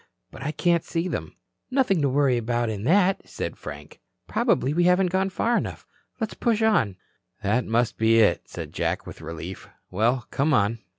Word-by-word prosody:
But - - -11
I 145 +2 -2
can't 170 0 +1
see 170 +1 -2
them." - - -4 0.3
"Nothing 255 - +2
to 140 - +2
worry 135 -1 +3
about 120 0 0
in 105 0 -5
that," 190 +4 +3
said - - -4
Frank. 75 0 -10 0.3
"Probably 135 +3 +1
we 175 +2 +2
haven't 180 0 +3
gone 190 +1 +1
far 230 +5 0
enough. - - -3 0.3
Let's 225 -2 -2
push 225 -2 0
on." 130 - +3 0.5
"That 110 +5 +1
must 115 +1 +1
be 110 0 +4
it," 110 -2 +3
said - - -7
Jack - - -1
with - - -10
relief. 85 +3 -7 0.2
"Well, 120 +6 +1
come 145 +1 +2
on." 105 +2 +1
135 Hz, 180 wpm, -25 LUFS, 115-185 Hz, 0.5 s, be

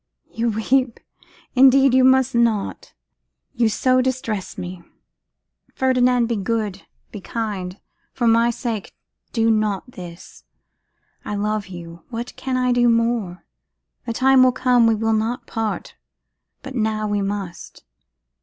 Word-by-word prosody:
You 230 +1 -1
weep! 235 +3 0 0.5
Indeed 270 0 +6
you 260 0 +5
must 260 0 +4
not; 230 -4 0 0.6
you 235 -3 +2
so 255 +4 +2
distress 245 -6 -3
me. 180 0 -6 0.9
Ferdinand, 250 -2 +2
be 230 -1 -1
good, 205 -1 -2 0.3
be 210 - -8
kind; 200 -4 -4 0.3
for 240 - -2
my 230 +1 +4
sake 230 -3 -4 0.4
do 225 -1 +2
not 215 +1 -1
this. 175 -5 -11 0.8
I 210 - -4
love 210 0 -2
you; 170 -2 -10
what 240 0 -6
can 260 -1 -3
I 250 0 +1
do 240 0 +3
more? 230 -6 0 0.6
The 230 - -1
time 265 +2 +4
will 255 0 +6
come 250 -2 +3
we 225 - +3
will 225 +1 0
not 230 +3 -1
part, 225 -1 -4 0.7
but 270 - -8
now 220 -3 -1
we 205 -1 0
must. 195 -3 -5
230 Hz, 135 wpm, -21 LUFS, 210-250 Hz, 0.9 s, Indeed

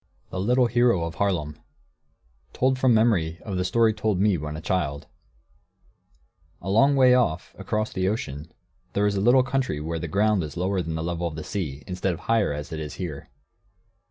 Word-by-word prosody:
THE 95 - -4
LITTLE 125 +6 +3
HERO 120 -6 +2
OF 85 0 -4
HAARLEM 90 -7 0
[Footnote 75 - -11
1: - - -35 0.9
Told 130 0 +1
from 130 -3 +4
memory 90 -8 +2
of 100 - -4
the 90 - 0
story 115 +3 +3
told 105 -3 -1
me 100 -1 +3
when 75 -1 -5
a - - -6
child.] 75 -5 -2 1.5
A 95 - -4
long 135 +7 +4
way 130 -2 +6
off, 120 -11 +1
across 110 0 -2
the 95 0 0
ocean, 80 -7 -4 0.4
there 100 - +1
is 105 -1 +1
a 95 - 0
little 125 +4 +5
country 130 - -1
where 80 +2 -3
the - - -4
ground 105 -1 +2
is 75 0 -6
lower 95 +1 0
than 80 -2 -4
the 80 - -3
level 85 0 -2
of 80 - -6
the 80 - -6
sea, 75 -9 -4
instead 90 0 -2
of - - -13
higher, 115 -7 +1
as 75 0 -5
it 80 - -4
is 75 -1 -6
here. 80 -7 -6
95 Hz, 205 wpm, -25 LUFS, 80-110 Hz, 1.5 s, way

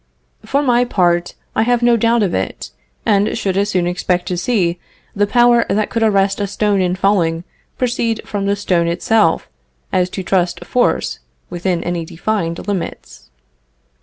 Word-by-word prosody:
For 280 +1 0
my 245 -2 +3
part 175 -6 +1 0.2
I - - +2
have 240 +1 +1
no 240 0 +5
doubt 230 0 +2
of 190 - 0
it, 95 -9 -3 0.3
and 205 +1 +2
should 190 -2 -1
as 200 +1 +1
soon 185 -3 +1
expect 180 0 -1
to 180 - -1
see 180 -3 0 0.4
the 205 0 +2
power 240 +1 +4
that 210 +1 0
could 230 - -1
arrest 200 -2 +2
a 200 - 0
stone 205 0 +1
in 180 0 0
falling 175 -4 +1 0.3
proceed 235 -3 0
from 200 -1 -3
the 200 - +2
stone 180 -4 0
itself, 175 +1 +1 0.5
as 180 0 +2
to 190 - -5
trust 180 -1 0
force 250 - 0 0.3
within 175 0 -1
any 175 -1 -2
defined 170 +1 -3
limits. 165 - -5
195 Hz, 165 wpm, -17 LUFS, 175-220 Hz, 0.5 s, no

